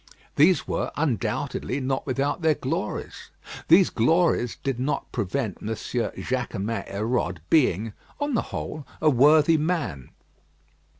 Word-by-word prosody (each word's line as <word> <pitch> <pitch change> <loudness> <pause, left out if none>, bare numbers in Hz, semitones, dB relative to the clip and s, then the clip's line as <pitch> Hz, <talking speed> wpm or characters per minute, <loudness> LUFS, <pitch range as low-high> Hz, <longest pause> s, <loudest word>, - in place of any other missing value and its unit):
These 170 +5 +4
were, - - -2
undoubtedly, 140 - -1
not 135 +1 -2
without 140 +5 -1
their 160 -2 +3
glories. - - -4 0.4
These 175 +3 +6
glories 125 -1 +2
did 135 -3 -3
not 140 +2 -2
prevent 105 +1 -2
M. - - -6
Jaquemin 115 -1 -3
Hérode 100 -3 -1
being, 115 - +3 0.3
on 290 -1 -1
the 235 - +2
whole, 150 -2 -5
a 155 - +4
worthy 150 +5 +5
man. 150 - -2
135 Hz, 120 wpm, -25 LUFS, 115-155 Hz, 0.4 s, These